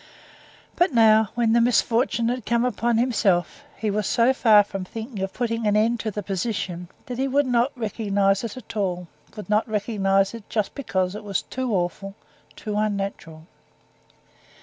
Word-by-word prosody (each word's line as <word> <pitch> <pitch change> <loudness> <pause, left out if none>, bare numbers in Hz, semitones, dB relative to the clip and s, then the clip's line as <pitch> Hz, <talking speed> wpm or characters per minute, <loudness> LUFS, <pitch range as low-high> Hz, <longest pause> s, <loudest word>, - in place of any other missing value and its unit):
But 350 0 +2
now, 220 -2 +5
when 230 -2 +2
the 235 - +4
misfortune 235 0 +2
had 250 -1 -3
come 235 +2 +1
upon 235 -1 0
himself, 230 -1 +1
he 215 -2 -1
was 210 -1 -1
so 240 +3 +3
far 215 -5 +5
from 195 -1 -6
thinking 225 +3 -7
of 190 0 -2
putting 230 -2 -2
an 210 0 +3
end 230 +2 +2
to 220 - -2
the 210 0 -5
position 185 -3 -3 0.2
that 250 -3 -6
he 270 - +1
would 280 +2 +2
not 245 +1 +2
recognize 200 -3 0
it 230 +1 -5
at 240 -2 -10
all, 180 -4 -2 0.3
would 210 - -8
not 215 +2 +1
recognize 200 -2 +1
it 230 -3 -10
just 215 -3 -1
because 190 -9 -2
it 210 - -7
was 200 -2 -2
too 260 -2 -4
awful, 190 +2 -3 0.4
too 210 -2 -5
unnatural. 195 -6 -3
215 Hz, 170 wpm, -24 LUFS, 195-235 Hz, 0.4 s, now